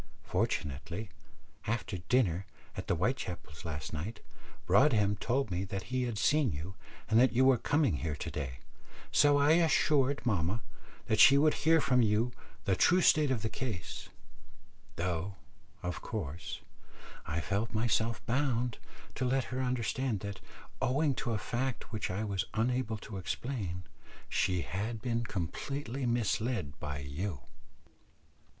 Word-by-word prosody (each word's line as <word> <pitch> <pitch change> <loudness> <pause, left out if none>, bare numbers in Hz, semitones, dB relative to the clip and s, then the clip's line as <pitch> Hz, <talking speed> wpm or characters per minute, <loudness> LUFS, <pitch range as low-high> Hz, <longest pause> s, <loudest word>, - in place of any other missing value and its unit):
Fortunately, 85 +8 -2 0.6
after 110 -4 -2
dinner 95 -2 +1 0.3
at - - -5
the - - +2
Whitechapels' 90 - -3
last 75 -3 -4
night, 95 +10 -4 0.5
Broadhem 105 0 +4
told 125 0 0
me 90 +2 -1
that 100 +5 -5
he 130 -1 +1
had 120 -3 -3
seen 140 +4 +3
you, 80 +5 -5 0.3
and 110 +1 +4
that 130 0 +5
you 130 +2 +4
were 130 -3 +5
coming 140 - +2
here 75 -1 -2
to - - -5
day, 65 -3 -4 0.5
so 145 -1 +5
I 145 +1 +5
assured 150 -5 +3
mamma 100 0 +1 0.4
that 110 - +1
she 135 +5 +9
would 150 +1 +5
hear 160 +1 +4
from 125 -4 +3
you 110 +2 +2 0.3
the 95 - +3
true 180 - +5
state 155 -4 +5
of 125 -5 0
the 110 - 0
case; 105 -8 -5 0.9
though, 90 +2 -2 0.5
of 90 0 -3
course, 85 - -5 0.7
I 80 - -1
felt 100 +8 -1
myself 115 0 +1
bound 125 -2 0 0.3
to - - -3
let 130 +1 +2
her 130 - -1
understand 125 -3 -1
that, 100 -1 -5 0.4
owing 140 +3 +2
to 120 - -3
a - - +1
fact 120 +4 -3
which 105 -1 -2
I 95 +4 -2
was 100 -3 -1
unable 115 0 0
to 105 -1 -8
explain, 95 -3 -3 0.4
she 90 -3 +1
had 110 +5 -3
been 115 +1 -1
completely 125 - -3
misled 115 - 0
by 70 -2 -4
you." 70 +2 -4
110 Hz, 145 wpm, -32 LUFS, 90-130 Hz, 0.9 s, she